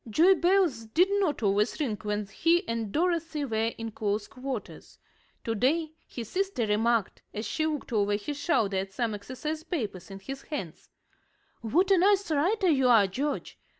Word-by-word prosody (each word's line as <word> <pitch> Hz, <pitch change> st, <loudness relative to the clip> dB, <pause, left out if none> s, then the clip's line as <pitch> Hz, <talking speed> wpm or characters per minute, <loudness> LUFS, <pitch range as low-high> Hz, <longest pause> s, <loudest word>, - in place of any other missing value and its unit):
Joy 335 Hz, -, +6 dB
bells 350 Hz, -10 st, +2 dB
did 350 Hz, -, +3 dB
not 300 Hz, -, 0 dB
always 205 Hz, +6 st, +1 dB
ring 260 Hz, -8 st, 0 dB
when 210 Hz, 0 st, -2 dB
he 330 Hz, -, +1 dB
and 230 Hz, -3 st, -2 dB
Dorothy 330 Hz, -, 0 dB
were 225 Hz, -2 st, 0 dB
in 225 Hz, 0 st, -5 dB
close 205 Hz, 0 st, -2 dB
quarters. 260 Hz, -3 st, -7 dB, 0.5 s
To 225 Hz, -, -1 dB
day 300 Hz, +8 st, +1 dB, 0.2 s
his 235 Hz, -3 st, -7 dB
sister 380 Hz, -, -1 dB
remarked, 220 Hz, 0 st, +1 dB
as 215 Hz, +2 st, -3 dB
she 315 Hz, +9 st, -1 dB
looked 300 Hz, -5 st, -4 dB
over 205 Hz, -1 st, +2 dB
his 275 Hz, +8 st, -4 dB
shoulder 215 Hz, -, +1 dB
at 190 Hz, 0 st, -3 dB
some 230 Hz, 0 st, -1 dB
exercise 260 Hz, +9 st, -5 dB
papers 225 Hz, -, -4 dB
in 195 Hz, 0 st, -8 dB
his 270 Hz, +7 st, -7 dB
hands: 235 Hz, -, -7 dB, 0.7 s
"What 345 Hz, -, +2 dB
a 380 Hz, -, +6 dB
nice 395 Hz, -1 st, +3 dB
writer 370 Hz, +7 st, +2 dB
you 265 Hz, -5 st, +3 dB
are, 225 Hz, -4 st, +6 dB
George. 275 Hz, +10 st, -3 dB
250 Hz, 170 wpm, -28 LUFS, 210-325 Hz, 0.7 s, Joy